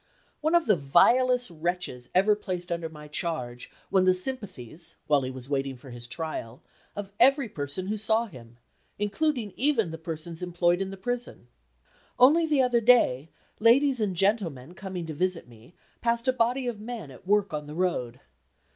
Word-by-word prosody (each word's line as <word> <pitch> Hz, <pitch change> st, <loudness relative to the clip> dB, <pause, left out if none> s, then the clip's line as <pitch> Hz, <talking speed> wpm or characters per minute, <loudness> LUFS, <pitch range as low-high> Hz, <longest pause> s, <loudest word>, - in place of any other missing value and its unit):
One 315 Hz, +3 st, +1 dB
of 340 Hz, -, +4 dB
the 210 Hz, -, +4 dB
vilest 245 Hz, -, +3 dB
wretches 170 Hz, -6 st, -3 dB
ever 200 Hz, +3 st, +5 dB
placed 180 Hz, -4 st, -5 dB
under 170 Hz, -1 st, -2 dB
my 150 Hz, -1 st, -11 dB
charge 135 Hz, -6 st, -4 dB, 0.2 s
won 190 Hz, -1 st, +4 dB
the 185 Hz, 0 st, +5 dB
sympathies 180 Hz, -, -3 dB
(while 145 Hz, -2 st, +3 dB
he 130 Hz, -, -3 dB
was 130 Hz, -1 st, -6 dB
waiting 135 Hz, -2 st, -2 dB
for 130 Hz, +1 st, -13 dB
his 120 Hz, 0 st, -9 dB
trial) 130 Hz, -5 st, -5 dB, 0.3 s
of 200 Hz, -1 st, -6 dB
every 275 Hz, +1 st, +5 dB
person 145 Hz, 0 st, -4 dB
who 210 Hz, +3 st, -2 dB
saw 220 Hz, +2 st, +2 dB
him, 120 Hz, -, -14 dB, 0.4 s
including 220 Hz, +1 st, -1 dB
even 240 Hz, -, +1 dB
the 160 Hz, -, -7 dB
persons 165 Hz, +1 st, -6 dB
employed 175 Hz, 0 st, +1 dB
in 195 Hz, -, -2 dB
the 195 Hz, -, -8 dB
prison. 245 Hz, -, -5 dB, 0.7 s
Only 305 Hz, +7 st, +6 dB
the 290 Hz, -4 st, +3 dB
other 245 Hz, -2 st, +2 dB
day, 190 Hz, -, +4 dB, 0.3 s
ladies 255 Hz, +3 st, +4 dB
and 195 Hz, -4 st, 0 dB
gentlemen 175 Hz, -, 0 dB
coming 185 Hz, -2 st, -6 dB
to 160 Hz, -, -5 dB
visit 180 Hz, 0 st, -2 dB
me 120 Hz, +7 st, -18 dB, 0.3 s
passed 235 Hz, +1 st, 0 dB
a 255 Hz, -, +4 dB
body 250 Hz, +2 st, +1 dB
of 240 Hz, -4 st, -3 dB
men 220 Hz, -, -7 dB
at 135 Hz, +8 st, -15 dB
work 205 Hz, -3 st, +2 dB
on 150 Hz, -1 st, -4 dB
the 150 Hz, -, -8 dB
road. 130 Hz, -9 st, -1 dB
185 Hz, 175 wpm, -27 LUFS, 150-235 Hz, 0.7 s, Only